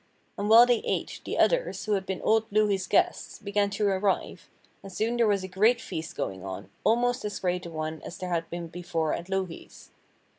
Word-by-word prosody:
And 205 +1 -2
while 230 +2 +9
they 245 -2 +3
ate, - - -3
the - - -3
others, - - +2
who 215 - -2
had 195 -2 0
been 190 - -4
old 220 0 +3
Louhi's 200 -3 +2
guests, - - +1
began 200 0 0
to 205 +1 -1
arrive, 195 0 0 0.3
and 195 - -10
soon 220 +5 -1
there 235 -2 +3
was 200 -2 +1
a - - -4
great 215 +6 +3
feast 160 -6 -6
going 95 -1 -4
on, 95 0 -7
almost 245 +2 +2
as 210 -1 -3
great 180 -1 -2
a - - -7
one 155 -1 -4
as - - -8
there 185 - -5
had 165 -1 -1
been 170 0 -5
before 165 -2 -2
at 170 +2 -5
Louhi's. 190 -3 -5
195 Hz, 210 wpm, -27 LUFS, 170-215 Hz, 0.3 s, while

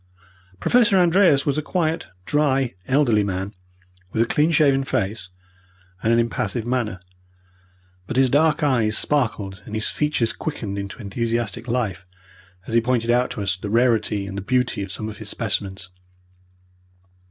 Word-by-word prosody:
Professor 235 -5 +4
Andreas 175 -5 +4
was 145 +1 +1
a - - -1
quiet, 165 0 -1 0.2
dry, 135 -4 +1
elderly 125 -6 +3
man, 95 +1 -3 0.6
with 110 - +2
a - - -1
clean 150 +6 +2
shaven 140 -4 +3
face 100 -6 -2 0.7
and 115 - +1
an 115 - +4
impassive 115 0 -1
manner, 120 -7 -2 1.1
but - - -3
his 135 0 +5
dark 150 +3 +2
eyes 115 -7 +2
sparkled 110 -9 -1
and 110 - -7
his 110 - -1
features 150 -7 0
quickened 105 -10 -4
into 100 0 -6
enthusiastic 115 +2 -2
life 105 -7 -2 0.6
as - - -6
he 115 - +5
pointed 120 -1 +1
out 125 +1 +2
to 115 -5 -4
us 95 -1 0
the 100 +2 -6
rarity 110 -3 +2
and 95 0 -7
the - - -5
beauty 125 +1 0
of 100 -1 -5
some 110 +2 -4
of 105 -2 -7
his - - -8
specimens. 95 -2 -3
115 Hz, 155 wpm, -22 LUFS, 105-140 Hz, 1.1 s, his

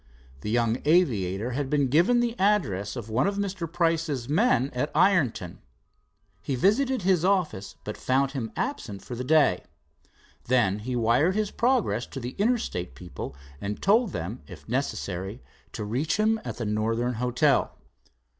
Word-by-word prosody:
The 90 - -5
young 115 +1 +1
aviator 120 - +2
had 135 +2 -2
been 145 -2 +2
given 175 - +4
the 240 -1 0
address, 120 - +1
of 120 -4 -6
one 115 +5 +1
of 200 0 -1
Mr. 190 -5 -3
Price's 165 -7 0
men 145 - +2
at 125 +5 -1
Ironton. 130 - +2 0.8
He 135 - -2
visited 240 - +2
his 180 -3 +3
office, 180 - 0
but 105 - -6
found 135 +1 +1
him 125 -6 -4
absent 120 - -4
for - - -7
the 125 +1 -4
day. 145 - +3 0.8
Then 115 -6 +2
he 125 +4 -4
wired 120 +10 +3
his 215 -1 0
progress 230 - +1
to 135 - -7
the 125 0 -5
Interstate 210 - -1
people 90 -5 -8 0.3
and 100 +1 -4
told 215 +1 +3
them 95 - -5
if - - -12
necessary 105 -4 -3 0.3
to 110 - -4
reach, 130 - -1
him 220 +1 +2
at - - -6
the 120 - -3
Northern 115 +3 0
Hotel. 125 +2 +2
130 Hz, 155 wpm, -26 LUFS, 110-185 Hz, 0.8 s, given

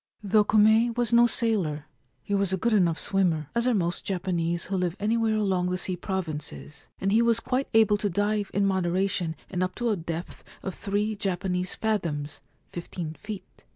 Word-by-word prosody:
Though 210 +1 +4
Kume 220 +3 +4
was 240 -1 0
no 235 0 +7
sailor, 195 -11 0 0.4
he 205 - -4
was 200 -2 +1
a 190 - +1
good 230 +5 +1
enough 175 -6 +3
swimmer, 170 -7 0
as 235 +1 +1
are 250 - +3
most 175 -3 -1
Japanese 175 -3 -1
who 195 - -3
live 180 -2 0
anywhere 220 +1 +1
along 190 -4 +1
the 180 - -1
sea 185 0 -2
provinces, 160 -5 -5
and 195 - 0
he 220 +3 +5
was 230 -1 +3
quite 255 +3 -1
able 215 -2 +5
to 205 0 -1
dive 205 +2 0
in 200 0 +1
moderation 185 -2 0
and 180 -1 -3
up 185 0 -1
to 240 -1 0
a - - +2
depth 170 -1 -6 0.2
of 190 - -3
three 210 +3 -1
Japanese 185 -2 -2
fathoms 165 -10 -2
— - - -40
fifteen 170 -2 -5
feet. 205 +3 -9
195 Hz, 190 wpm, -27 LUFS, 175-215 Hz, 0.4 s, no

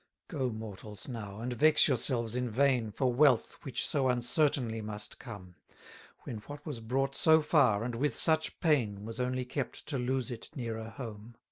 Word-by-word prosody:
32 - - -6
Go, 130 -2 0
mortals, 105 -1 -8
now; 105 -5 -6
and 125 +1 -3
vex 155 +5 +5
yourselves 120 -3 0
in 125 -1 -1
vain 125 -1 +2
For 130 +2 0
wealth, 130 -2 +3
which 135 -6 -1
so 135 -3 +2
uncertainly 125 -2 +1
must 105 0 -4
come: 100 -7 -10 0.7
When 115 - -6
what 145 +8 -10
was 145 -7 -5
brought 135 +4 -1
so 160 +2 +6
far, 130 -9 +3
and 120 +1 -3
with 130 +2 0
such 160 -1 +3
pain, 110 - +1
Was 115 +1 -7
only 125 0 -1
kept 135 +1 -4
to 140 -4 -1
lose 130 +1 -1
it 115 - -8
nearer 115 -4 -4
home. 110 -1 -9
125 Hz, 175 wpm, -31 LUFS, 110-135 Hz, 0.7 s, so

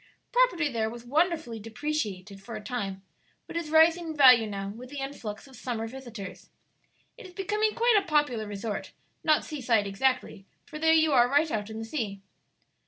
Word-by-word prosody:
Property 485 -11 +3
there 225 -5 -1
was 235 +1 -10
wonderfully 310 -3 0
depreciated 215 -5 -4
for 225 +3 -8
a 215 - -7
time, 200 -4 -4 0.4
but - - -10
is 335 -2 -3
rising 325 +2 +5
in 315 -1 -5
value 250 -5 +7
now 195 -1 -4
with 240 +5 -9
the 290 - -8
influx 270 -6 -6
of 265 - -15
summer 235 -3 -4
visitors. 235 -5 -9 0.7
It 450 - -10
is 360 - -16
becoming 420 +2 0
quite 470 0 +4
a 390 - -8
popular 295 -9 +1
resort 205 +1 -5 0.3
not 310 -2 +3
sea 300 -3 -6
side 230 -4 +2
exactly, 200 -1 -1 0.2
for 305 - -8
there 320 +1 +4
you 320 -1 +4
are 245 -3 +5
right 295 +3 +2
out 210 -1 -2
in 220 - -7
the 225 - -5
sea." 215 -7 -4
250 Hz, 185 wpm, -28 LUFS, 215-315 Hz, 0.7 s, value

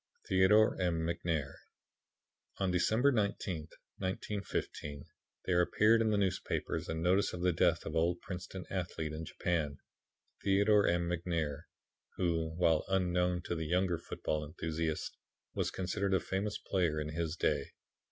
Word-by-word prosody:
Theodore 95 +3 +4
M. 85 -2 +1
McNair 80 -4 -1 1.0
On 95 -2 0
December 110 +10 +3
19th, 100 - -1 0.3
1915, 95 -6 -3 0.4
there 90 -1 +3
appeared 110 +5 +4
in 110 - +2
the 105 - +2
newspapers 95 -3 -1
a 80 - -1
notice 90 +5 +2
of 90 - -5
the 90 -1 +3
death 85 0 +2
of - - -3
an 80 - +2
old 85 +2 +1
Princeton 95 0 -7
athlete, 85 -4 -3
in 80 +1 -5
Japan 75 -4 -1 0.7
Theodore 100 +1 +4
M. 85 0 +1
McNair 85 -3 -2 0.5
who, 80 -3 0
while 80 -3 +3
unknown 90 -2 +1
to - - -3
the 80 -2 -3
younger 90 0 +1
football 75 -2 -3
enthusiasts, 80 +1 -3 0.4
was - - 0
considered 95 +1 -1
a - - +3
famous 100 +2 -2
player 85 -5 0
in 75 0 -3
his 80 +1 -2
day. 75 -4 +1
90 Hz, 140 wpm, -33 LUFS, 80-95 Hz, 1.0 s, Theodore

